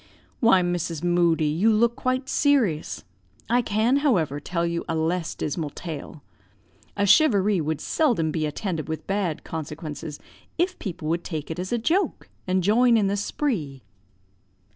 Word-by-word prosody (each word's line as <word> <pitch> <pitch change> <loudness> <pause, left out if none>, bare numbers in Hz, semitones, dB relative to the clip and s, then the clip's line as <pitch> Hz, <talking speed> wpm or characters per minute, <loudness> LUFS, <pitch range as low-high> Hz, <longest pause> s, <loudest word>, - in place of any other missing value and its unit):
"Why, 210 -6 +5
Mrs. 175 -2 -2
Moodie, 175 -2 +2
you 170 +9 +2
look 235 +2 +3
quite 255 0 -1
serious. 260 - +1 0.5
I 245 +1 +4
can, 225 +4 +2
however, 180 - +1
tell 170 +3 -2
you 170 0 -2
a 165 - 0
less 165 +2 -1
dismal 150 0 -3
tale, 155 -1 -8 0.7
A 200 - +2
charivari 205 - +4
would 155 0 -2
seldom 230 - +1
be 155 0 -1
attended 160 0 -4
with 160 - -4
bad 195 -5 -2
consequences 150 -1 -6 0.4
if 360 +2 0
people 180 -5 -5
would 170 +1 0
take 155 -3 -5
it 160 - -5
as 185 +1 -4
a 240 - +2
joke, 330 - 0 0.2
and 185 0 +1
join 230 +4 +4
in 210 - +2
the 195 +1 +1
spree." 195 - -2
180 Hz, 155 wpm, -25 LUFS, 160-230 Hz, 0.7 s, Why